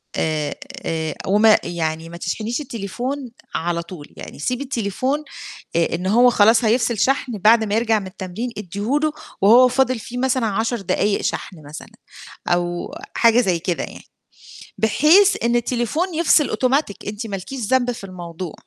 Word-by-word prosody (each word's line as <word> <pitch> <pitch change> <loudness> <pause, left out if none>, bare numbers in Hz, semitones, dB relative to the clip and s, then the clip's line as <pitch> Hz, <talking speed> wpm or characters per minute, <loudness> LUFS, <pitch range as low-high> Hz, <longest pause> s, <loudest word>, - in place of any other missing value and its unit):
آآ، 155 -2 -1 0.3
آآ، 160 -1 -2
وما 210 +2 +5
يعني 165 -1 -3
ما 170 - -9
تشحنيش 220 - -3
التليفون 245 +2 -5 0.2
على 170 +1 -1
طول، 170 -3 -10
يعني - - -10
سيبِي 250 - -2
التليفون 260 +3 -2 0.5
آآ، 170 0 +1
إن 180 +2 -3
هو 240 +5 +5
خلاص 225 +1 +4
هيفصل 235 0 +2
شحن 255 -2 0
بعد 220 +3 +5
ما 205 -1 -2
يرجع 225 -1 +2
من 195 - -7
التمرين 190 +6 -5
ادّيه 210 - -2
له 310 -1 +1 0.3
وهو 240 +5 +7
فاضل 255 0 +1
فيه 240 +3 -7
مثلًا 255 -2 +1
10 225 +3 -1
دقايق 200 +2 0
شحن 185 - -3
مثلًا، 150 +2 -9 0.6
أو 175 0 -1 0.2
حاجة 230 +1 +5
زي 185 -7 +1
كده 175 0 -2
يعني، - - -10 0.7
بحيث 310 - +4
إن 235 0 +2
التليفون 245 - -1
يفصل 315 -2 +3
أوتوماتيك 260 -4 0
أنتِ 210 +2 -5
ما 200 - -4
لكيش 255 +8 -7
ذنب 245 +2 +1
في 230 - -9
الموضوع. 175 -3 -7
220 Hz, 160 wpm, -21 LUFS, 185-250 Hz, 0.7 s, وهو